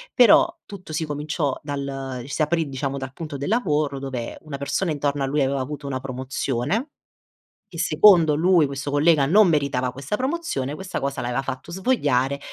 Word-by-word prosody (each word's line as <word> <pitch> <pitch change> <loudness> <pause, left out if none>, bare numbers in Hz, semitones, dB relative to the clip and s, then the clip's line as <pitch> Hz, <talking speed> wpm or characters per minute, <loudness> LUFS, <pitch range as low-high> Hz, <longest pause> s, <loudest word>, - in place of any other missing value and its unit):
però 300 +7 +6
tutto 195 -5 -10
si 160 +1 -1
cominciò 150 -1 -2
dal 135 -3 -5
si 140 +3 -3
aprì, 160 0 +1
diciamo, 135 0 -3
dal 130 -1 -6
punto 150 -1 -6
del 140 +6 -4
lavoro 150 - 0
dove 130 -4 -5
una 150 -3 -7
persona 150 +6 -1
intorno 145 -1 -1
a 135 - 0
lui 145 0 +1
aveva 135 0 0
avuto 145 +2 -5
una 130 -2 -3
promozione. 130 - -2 0.8
Che - - -8
secondo 170 -7 +5
lui 170 0 +4
questo 140 +1 -4
collega 145 0 +4
non 200 +8 +5
meritava 140 -5 0
questa 140 +9 -3
promozione, 260 - -2
questa 190 +3 -5
cosa 140 0 -2
l'aveva 120 +2 -1
fatto 135 +4 -6
svogliare 145 - +1
145 Hz, 170 wpm, -23 LUFS, 135-165 Hz, 0.8 s, però